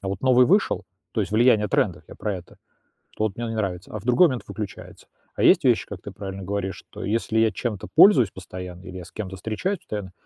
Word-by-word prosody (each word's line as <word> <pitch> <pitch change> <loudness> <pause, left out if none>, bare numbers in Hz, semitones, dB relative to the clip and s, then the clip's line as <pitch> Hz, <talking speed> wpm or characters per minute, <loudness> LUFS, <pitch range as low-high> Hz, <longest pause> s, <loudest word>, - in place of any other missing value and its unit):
а 95 - -4
вот 100 - -3
новый 125 -1 +5
вышел, 195 - +2 0.3
то 110 - 0
есть 100 +1 -3
влияние 110 -2 +4
трендов, - - 0
я - - -10
про 105 - -3
это, 90 -1 -13 0.6
то 110 - 0
вот 100 - -3
мне 120 0 -3
не 115 - -4
нравится, 95 -4 -3
а 110 - -3
в 100 - -14
другой 125 +9 +6
момент 130 -6 -3
выключается. 100 0 -8 0.3
А - - -1
есть - - +6
вещи, - - +3
как - - -8
ты - - -8
правильно 95 -1 -7
говоришь, 95 0 -3
что - - -10
если 110 +1 0
я 110 -1 +4
чем-то 105 0 -4
пользуюсь 155 - +7
постоянно, 90 -1 -9
или 95 0 -8
я 90 - -8
с - - -14
кем-то 95 -3 -6
встречаюсь 110 - -3
постоянно, 100 -3 -6
105 Hz, 235 wpm, -24 LUFS, 95-115 Hz, 0.6 s, пользуюсь